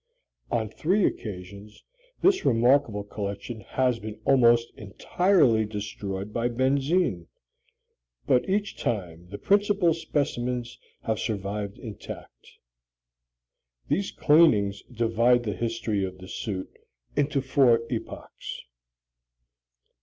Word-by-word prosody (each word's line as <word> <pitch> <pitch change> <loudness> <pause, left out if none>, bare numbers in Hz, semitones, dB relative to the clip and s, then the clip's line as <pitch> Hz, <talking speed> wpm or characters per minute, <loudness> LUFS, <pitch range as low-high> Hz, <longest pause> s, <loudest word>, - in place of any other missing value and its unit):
On 115 -2 0
three 180 - +1
occasions 100 +1 -6 0.4
this 385 0 +4
remarkable 120 -3 +3
collection 105 +3 -5
has 125 +2 0
been 110 0 -8
almost 120 -3 +4
entirely 120 - +2
destroyed 105 -1 -5
by 120 +1 0
benzine, 135 - +1 1.0
but 125 +7 +2
each 200 +1 0
time 90 - -3
the 100 - -6
principal 200 - +3
specimens 125 -6 -2 0.2
have 110 -1 -1
survived 100 -2 -3
intact. 110 -4 -10 1.4
These 200 - 0
cleanings 110 -11 +4
divide 120 +1 +2
the 105 -3 -2
history 115 -1 -2
of 95 -1 -4
the 95 0 -11
suit 95 -1 -5 0.4
into 145 -1 +1
four 130 -3 +3
epochs. 115 - -6
115 Hz, 100 wpm, -26 LUFS, 105-135 Hz, 1.4 s, this